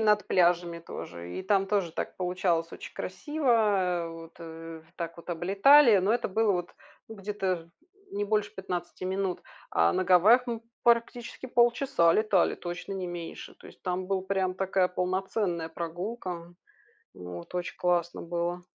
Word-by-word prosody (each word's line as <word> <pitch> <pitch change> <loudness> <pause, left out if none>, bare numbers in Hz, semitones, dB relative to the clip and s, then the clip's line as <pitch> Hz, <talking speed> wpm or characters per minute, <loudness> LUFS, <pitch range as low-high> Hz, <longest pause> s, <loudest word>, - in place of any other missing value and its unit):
над 210 -1 +3
пляжами 175 -1 +2
тоже. 85 - -8
И - - -4
там 195 0 +2
тоже 195 -5 0
так - - -4
получалось 180 -2 0
очень - - -9
красиво, 295 -3 -2
э, 190 -7 +2
вот, 165 0 -10
э, 165 0 -9
в - - -28
Так 170 0 -5
вот 170 - -13
облетали, 200 - +6
но 195 +4 +2
это 235 - -1
было, 215 +1 +2
вот, 175 -1 -2 0.4
ну, 220 - -10
где-то 195 -2 -1
ж 165 0 -12 0.4
не 205 +1 -2
больше 210 0 0
15 180 -1 -5
минут, 190 -1 -2 0.3
а 85 +1 +3
на 185 - +1
Гавайях 210 +8 +6
мы 230 -1 -3 0.2
практически 235 +1 +1
полчаса 240 -7 +3
летали, 210 -4 +3
точно 175 +3 -6
не 185 -2 -3
меньше. 175 -1 -7
То - - -15
есть - - -16
там 185 0 -2
была 195 -1 0
прям 190 -1 0
такая 190 -1 +1
полноценная 180 -2 -1
прогулка. 175 +1 -5 0.6
Вот 90 - -9
очень 180 0 -3
классно 175 -1 0
было. 175 +1 -2
185 Hz, 160 wpm, -28 LUFS, 170-205 Hz, 0.6 s, облетали